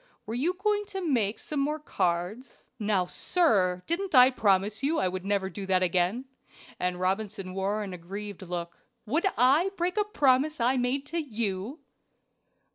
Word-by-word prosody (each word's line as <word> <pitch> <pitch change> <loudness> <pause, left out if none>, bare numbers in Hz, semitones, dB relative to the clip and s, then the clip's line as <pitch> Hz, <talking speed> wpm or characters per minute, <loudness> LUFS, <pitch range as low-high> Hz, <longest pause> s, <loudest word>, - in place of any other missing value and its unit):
Were 220 - -5
you 310 +10 0
going 415 +2 0
to 385 -3 -4
make 225 -7 +1
some 300 - -4
more 295 +2 0
cards?" 205 - -3
"Now, 205 -4 +1
sir, 185 - +1
didn't 355 0 -2
I 255 +1 +8
promise 205 -2 +1
you 300 +4 +1
I 185 - +1
never 190 +2 -1
would 190 - -6
do 195 -2 -6
that 185 -1 +3
again;" 185 +8 +1 0.5
and 180 0 -1
Robinson 195 0 -2
wore 200 +3 -1
an 195 -2 -6
aggrieved 200 +3 -7
look. 175 -2 -6 0.3
"Would 315 - +1
I 275 +10 +4
break 355 +3 -1
a 420 - +4
promise 295 -6 +2
I 245 +3 +2
made 255 +2 0
to 335 +3 -3
you?" 230 - -3
220 Hz, 165 wpm, -28 LUFS, 190-295 Hz, 0.5 s, I